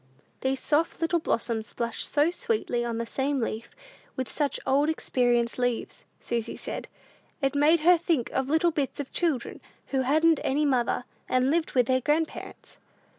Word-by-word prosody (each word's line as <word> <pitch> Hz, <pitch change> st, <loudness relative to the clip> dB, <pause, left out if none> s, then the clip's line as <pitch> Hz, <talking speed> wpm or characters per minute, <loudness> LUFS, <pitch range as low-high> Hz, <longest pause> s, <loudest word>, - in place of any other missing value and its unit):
These 265 Hz, 0 st, -1 dB
soft 315 Hz, +5 st, +1 dB
little 335 Hz, +1 st, +1 dB
blossoms 230 Hz, -6 st, -2 dB
blushed 235 Hz, -1 st, -3 dB
so 295 Hz, +3 st, +3 dB
sweetly 355 Hz, -, -1 dB
on 235 Hz, -1 st, -2 dB
the 230 Hz, -, -2 dB
same 270 Hz, +4 st, -1 dB
leaf 225 Hz, -1 st, -3 dB, 0.5 s
with 260 Hz, -1 st, -2 dB
such 290 Hz, -2 st, -1 dB
old 285 Hz, +3 st, +3 dB
experienced 245 Hz, -6 st, +1 dB
leaves! 245 Hz, -2 st, -2 dB
Susy 235 Hz, -1 st, -3 dB
said, -, -, -6 dB, 0.5 s
"it 275 Hz, -2 st, 0 dB
made 300 Hz, +3 st, +4 dB
her 350 Hz, +1 st, +6 dB
think 320 Hz, -8 st, 0 dB
of 265 Hz, 0 st, -1 dB
little 320 Hz, +3 st, +3 dB
bits 290 Hz, -4 st, -2 dB
of 285 Hz, -, -5 dB
children 315 Hz, -9 st, -1 dB, 0.3 s
who 265 Hz, -1 st, +1 dB
hadn't 310 Hz, +4 st, +3 dB
any 295 Hz, +3 st, +1 dB
mother, 250 Hz, -3 st, +1 dB, 0.3 s
and 255 Hz, +2 st, +2 dB
lived 330 Hz, 0 st, 0 dB
with 250 Hz, -2 st, +4 dB
their 260 Hz, +2 st, +2 dB
grandparents." 305 Hz, +4 st, -2 dB
270 Hz, 165 wpm, -27 LUFS, 245-315 Hz, 0.5 s, her